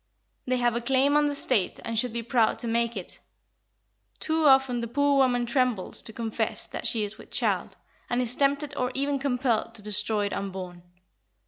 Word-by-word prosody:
They 255 0 +1
have 240 -1 +1
a 235 - -1
claim 270 +4 +2
on 295 0 +4
the 290 - -2
State 245 -8 0
and 230 - -3
should 250 0 0
be 235 0 -3
proud 235 -1 +2
to 240 - -4
make 235 0 0
it. 185 - -8 1.0
Too 320 0 0
often, 265 -3 +4
the 235 - -3
poor 285 +3 +2
woman 250 -3 +3
trembles 240 -5 +1
to - - -7
confess 225 -1 -2
that - - -3
she 225 -3 +1
is 210 +1 -5
with - - -13
child, - - -1 0.3
and 245 - 0
is 250 -1 -1
tempted 285 +1 0
or 250 -2 -1
even 280 +1 0
compelled 250 -4 0
to 210 - -8
destroy 210 0 -1
it 200 - -3
unborn. 185 -2 -5
245 Hz, 195 wpm, -27 LUFS, 225-270 Hz, 1.0 s, on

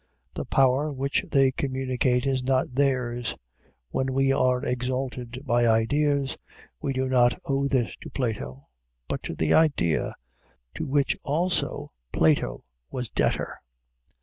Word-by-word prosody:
The - - -4
power 135 +3 +3
which 140 0 -1
they 135 -1 +5
communicate 130 -2 0
is 135 -2 0
not 130 -1 +1
theirs. 125 -3 0 0.6
When 130 0 -1
we 135 0 +3
are 130 -1 +2
exalted 125 -1 -3
by 120 -2 +3
ideas, 140 +5 +2 0.5
we 140 - -1
do 130 0 0
not 125 -2 +3
owe 140 0 +1
this 130 -5 0
to - - -10
Plato, 70 - -3 0.4
but - - -3
to - - -5
the 80 0 +1
idea, 140 - +2 0.6
to - - -4
which, 140 0 +2
also, 170 +6 0 0.2
Plato 80 -1 +2 0.3
was 125 -3 -4
debtor. - - -1
130 Hz, 130 wpm, -26 LUFS, 120-135 Hz, 0.6 s, they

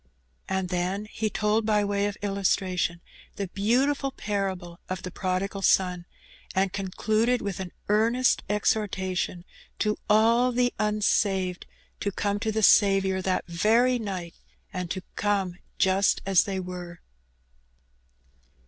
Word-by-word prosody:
And 190 -1 -1
then 185 +3 -1
he 215 0 -3
told, 210 +2 +1
by 210 -1 +2
way 200 0 0
of 205 - -5
illustration, 185 -3 0 0.3
the 200 -2 -4
beautiful 260 +8 +1
parable 190 -6 -3
of 185 0 -4
the 185 - -5
Prodigal 190 +2 -2
Son, 180 -2 +2 0.5
and 190 0 +1
concluded 215 +5 0
with 200 -2 -4
an 185 -2 -5 0.2
earnest 230 +5 +3
exhortation 190 -4 -1 0.3
to 210 -1 0
all 230 +4 +4
the 245 0 +1
unsaved 200 -3 +1 0.3
to 200 - -1
come 205 +1 -1
to 220 +1 -1
the 220 0 -1
Saviour 195 -2 +5
that 185 0 -1
very 225 +9 +2
night, 185 -6 -5 0.4
and 180 -2 -4
to 185 +3 -4
come 195 -4 0 0.2
just 190 +1 +3
as 195 -2 +4
they 195 -2 -3
were. 180 -2 -7
195 Hz, 130 wpm, -26 LUFS, 185-215 Hz, 0.5 s, Saviour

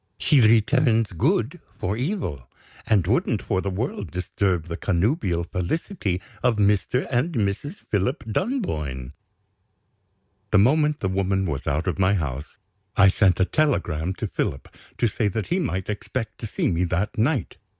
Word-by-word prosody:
She 145 -4 +4
returns 115 +1 +4
good 120 - 0 0.2
for 95 +3 -2
evil, 120 - -3 0.4
and 100 -6 +3
wouldn't 110 +1 +1
for 95 -4 0
the 100 - -2
world 125 - -3
disturb 90 -1 -1
the 85 -1 -5
connubial 95 - 0
felicity 90 - -2 0.2
of 125 -2 +3
Mr. 105 +5 +2
and 135 +8 +1
Mrs. 105 - -1 0.2
Philip 115 - 0
Dunboyne." 75 - -2 1.4
The 105 - +4
moment 150 +8 +3
the 95 - 0
woman 95 0 0
was 75 -6 -3
out 75 +4 0
of 90 0 -2
my 95 +1 +4
house, 75 -4 -4 0.4
I 95 -1 +7
sent 95 -2 +3
a 95 - +4
telegram 95 - 0
to - - -4
Philip 70 - -3 0.3
to - - +1
say 110 0 0
that 105 +2 -3
he 180 - +1
might 95 - -2
expect 110 +3 -4
to 115 - -5
see - - 0
me 85 +1 +1
that 90 +7 -1
night. 125 - 0
100 Hz, 155 wpm, -24 LUFS, 90-125 Hz, 1.4 s, I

